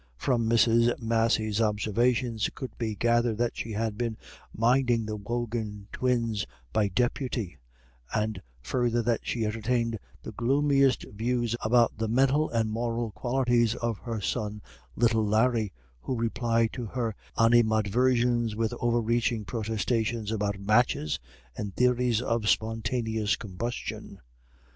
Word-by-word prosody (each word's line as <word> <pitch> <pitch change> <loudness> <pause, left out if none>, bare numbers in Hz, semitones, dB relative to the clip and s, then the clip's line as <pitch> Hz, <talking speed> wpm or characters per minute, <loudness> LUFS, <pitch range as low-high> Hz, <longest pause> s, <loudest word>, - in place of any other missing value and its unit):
From 115 - +1
Mrs. 115 +1 +4
Massey's 115 -1 +1
observations 115 +2 +1
it - - -12
could 130 - -7
be 110 -2 -2
gathered 120 0 +2
that 120 0 0
she 110 - -5
had 110 0 -2
been 115 -2 -2 0.3
minding 120 0 +2
the 110 0 -3
Wogan 110 -1 -4
twins 115 -5 0 0.3
by 105 -2 +3
deputy, 115 - -2 0.5
and 110 -3 -1 0.2
further 120 - 0
that 115 0 +1
she 115 -2 -2
entertained 115 +1 -1 0.2
the - - -6
gloomiest 135 +1 +2
views 120 +2 0
about 115 -1 +3
the 110 - 0
mental 135 +6 +2
and 110 -2 0
moral 115 0 -2
qualities 120 -1 +1
of 115 -3 -2
her 115 -3 -4
son 105 +1 -3 0.3
little 115 -2 +3
Larry, 110 0 +2 0.3
who 125 - -3
replied 115 0 0
to 120 -3 -5
her 115 -1 -2 0.2
animadversions 120 +1 +3
with 110 0 -1
over 120 0 +2
reaching 115 -1 0
protestations 110 0 -1
about 105 -2 -1
matches 105 -6 +2 0.4
and 100 -2 -5
theories 125 -2 +2
of 115 -4 0
spontaneous 110 -1 0
combustion. 115 +4 -5
115 Hz, 130 wpm, -28 LUFS, 110-120 Hz, 0.5 s, Mrs